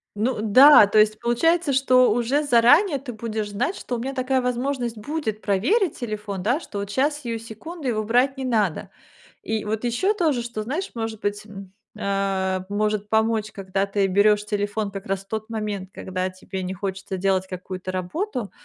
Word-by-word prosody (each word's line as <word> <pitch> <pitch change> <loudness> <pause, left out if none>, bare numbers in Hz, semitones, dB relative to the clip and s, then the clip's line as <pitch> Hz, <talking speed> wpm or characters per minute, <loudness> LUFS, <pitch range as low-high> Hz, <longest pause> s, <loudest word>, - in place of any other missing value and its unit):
Ну 220 +3 -1
да, 255 +2 +8
то 205 - 0
есть 215 0 +3
получается, 325 +7 +2
что 255 -2 +4
уже 245 +6 +1
заранее 285 - +5
ты 265 -2 -8
будешь 220 -1 -4
знать, 245 - -1
что 245 - -4
у - - -3
меня 265 +3 -4
такая 260 0 +1
возможность 250 -1 -2
будет 220 -3 -4
проверить 300 - +1
телефон, 210 -4 -4
да, 240 - +1
что 210 -11 -7
вот 200 0 -5
щас, 290 +7 0
сию 230 -3 -4
секунду, 265 +8 -8
его 215 -3 0
брать 250 +5 +2
не 265 - -4
надо. 215 -9 0 0.5
И 220 -1 -2
вот 220 +2 -2
ещё 245 - +1
тоже, 315 - +1
что, 235 -2 -5
знаешь, 310 - -3
может 225 -2 -4
быть, 205 +1 -2
м, 195 -3 -11 0.3
а, 195 -2 -1
может 210 0 -1
помочь, 220 -1 +1
когда 195 -1 -2
ты 200 0 0
берёшь 205 +2 +3
телефон 205 0 -2
как 195 0 -7
раз 195 0 -1
в - - -42
тот 220 +2 -5
момент, 210 -4 -4
когда 185 0 -3
тебе 185 +1 -7
не 185 +1 -3
хочется 190 0 -5
делать 190 0 +1
какую-то 185 0 -6
работу, 220 - -3
220 Hz, 185 wpm, -23 LUFS, 200-255 Hz, 0.5 s, да